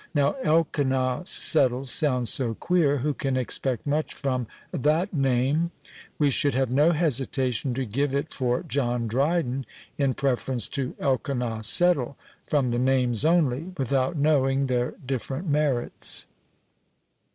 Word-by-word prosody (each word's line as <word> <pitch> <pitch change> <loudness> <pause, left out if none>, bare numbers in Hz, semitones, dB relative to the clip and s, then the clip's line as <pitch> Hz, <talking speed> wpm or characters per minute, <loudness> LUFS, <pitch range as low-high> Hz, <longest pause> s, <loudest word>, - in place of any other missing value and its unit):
Now 140 -1 +2
Elkanah 135 - +1
Settle 135 -7 +2
sounds 125 -4 +1
so 120 -4 -1
queer, 165 -3 +2
who 145 +3 -1
can 135 -2 -2
expect 130 0 -1
much 150 +2 -1
from 130 -4 -2 0.2
that 160 +5 +1
name? 135 +3 +1 0.5
We 145 -2 +3
should 140 0 +2
have 130 -2 +1
no 145 +6 +4
hesitation 135 -5 0
to 130 0 -2
give 135 +5 -1
it 140 +3 -2
for 125 -2 -1
John 120 -3 -1
Dryden 135 +2 0 0.4
in 135 -2 +1
preference 130 -3 0
to 135 -3 -3
Elkanah 125 -4 -1
Settle, 140 - +2 0.3
from 140 -4 +2
the 120 0 0
names 125 -2 +2
only, 160 0 +1
without 135 +2 0
knowing 140 -2 +2
their 125 -2 -1
different 135 +5 -3
merits." 145 -5 -1
135 Hz, 130 wpm, -25 LUFS, 125-150 Hz, 0.5 s, no